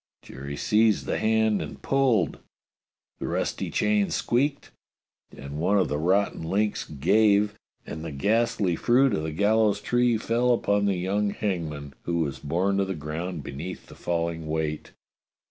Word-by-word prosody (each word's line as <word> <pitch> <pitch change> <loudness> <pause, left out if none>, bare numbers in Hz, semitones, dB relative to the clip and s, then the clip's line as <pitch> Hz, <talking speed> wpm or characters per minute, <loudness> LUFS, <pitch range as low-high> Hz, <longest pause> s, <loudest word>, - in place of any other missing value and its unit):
Jerry 70 +2 -7
seized 110 0 +2
the - - -1
hand 110 -1 +2
and - - -7
pulled. 125 - +1 0.8
The - - -4
rusty - - -2
chain 105 -1 +1
squeaked, 140 +4 0 0.7
and 70 +2 -7
one 95 +5 +2
of 95 - +2
the 75 - -1
rotten 95 +5 +1
links 100 +6 -1
"gave," 105 +7 +3 0.3
and 80 - -7
the 80 - -5
ghastly 100 +3 +1
fruit 125 +6 +3
of 90 - 0
the 80 0 -3
gallows 105 +4 +2
tree 120 +2 +2
fell 120 +2 +2
upon 100 -2 +1
the 100 -1 +2
young 100 +3 0
hangman, 80 -9 -3
who 85 0 -2
was 70 -4 -3
borne 90 +6 0
to 100 - +2
the 95 -1 -3
ground 80 +2 -5
beneath 75 +7 -7
the - - -14
falling 85 -2 -2
weight. 75 -1 -3
100 Hz, 155 wpm, -26 LUFS, 80-110 Hz, 0.8 s, gave